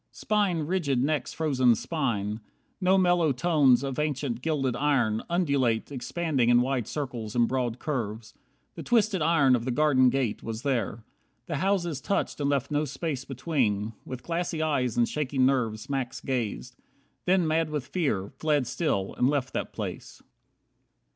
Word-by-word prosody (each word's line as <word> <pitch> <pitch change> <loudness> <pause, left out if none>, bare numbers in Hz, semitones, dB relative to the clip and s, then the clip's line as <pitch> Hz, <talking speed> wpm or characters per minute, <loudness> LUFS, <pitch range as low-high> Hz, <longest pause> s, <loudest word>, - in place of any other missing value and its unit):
Spine 205 -6 0
Rigid 150 -7 0
next 150 +1 -1
frozen 130 -7 +3
spine. 110 -8 -2 0.4
No 185 +1 +4
mellow 175 -4 +3
tones 140 -3 +3
Of 135 0 -3
ancient 140 -5 -2
gilded 135 -5 0
iron, 125 -7 +1
undulate, 140 -10 +1
Expanding 135 -1 0
in 120 0 +6
wide 130 -3 -1
circles 120 -7 -5
and 120 -1 +4
broad 125 -2 -1
curves, 115 -7 -4 0.4
The - - -8
twisted 220 -6 +2
iron 150 -5 +4
of 120 - -2
the 130 - -3
garden 130 -1 +4
gate, 125 -5 -1
Was 115 +1 -5
there. 115 -5 -1 0.4
The 150 - -3
houses 175 -4 0
touched 200 - -1
and 140 -1 0
left 140 0 0
no 150 +1 +1
space 140 -1 -4
Between. 120 -7 -1
With 130 -1 -7
glassy 170 -1 -2
eyes 135 -7 0
and 120 -1 +4
shaking 135 -3 0
nerves 115 -5 0
Max 135 -3 -3
gazed. 125 -1 -3 0.5
Then 185 -1 +3
mad 160 0 +1
with 150 -3 -3
fear, 135 - -1
fled 150 -4 +2
still, 120 - -1
and 125 - +4
left 140 -3 -1
that - - -3
place. - - -7
135 Hz, 155 wpm, -27 LUFS, 120-155 Hz, 0.5 s, in